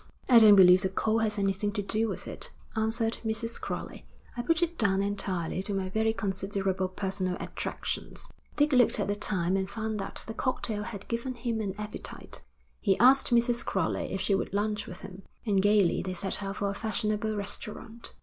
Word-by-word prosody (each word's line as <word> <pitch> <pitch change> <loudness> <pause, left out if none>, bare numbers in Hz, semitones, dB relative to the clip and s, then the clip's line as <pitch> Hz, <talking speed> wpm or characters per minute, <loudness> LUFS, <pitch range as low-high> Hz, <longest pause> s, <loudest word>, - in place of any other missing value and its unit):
'I 240 -2 +8
don't 215 -2 +9
believe 185 -1 +8
the 190 - 0
coal 220 +3 +1
has 215 -1 0
anything 195 +1 0
to 205 -2 -2
do 215 +3 +1
with - - -5
it,' - - -5 0.3
answered 225 +1 0
Mrs. 225 +1 -2
Crowley. - - -5 0.3
'I 240 - -2
put 330 +7 +2
it 340 0 -1
down 195 -7 +2
entirely 190 -3 -1
to 200 +1 -3
my 190 -1 -2
very 220 +3 +1
considerable 195 -2 -1
personal 185 -1 -2
attractions.' - - -4 0.2
Dick 295 0 +3
looked 245 -3 +5
at 205 - 0
the 205 - 0
time 190 -3 0
and 190 0 -1
found 220 0 -3
that 195 - -5
the 225 - -6
cocktail 225 -3 -2
had 210 -2 -7
given 240 +2 -3
him 235 -2 -2
an 195 -2 -3
appetite. 210 0 -5 0.4
He 195 -3 +2
asked 260 +3 +6
Mrs. 240 0 +3
Crowley - - -1
if 190 - -2
she 195 +1 +1
would 195 - -1
lunch 210 0 -1
with 180 - -9
him, 190 0 -9 0.2
and 200 -3 +3
gaily 205 -3 +3
they 185 0 -4
set 195 +3 -1
out 195 0 -4
for 200 -1 0
a - - -4
fashionable 215 0 -1
restaurant. 210 +3 -5
210 Hz, 195 wpm, -29 LUFS, 195-225 Hz, 0.4 s, don't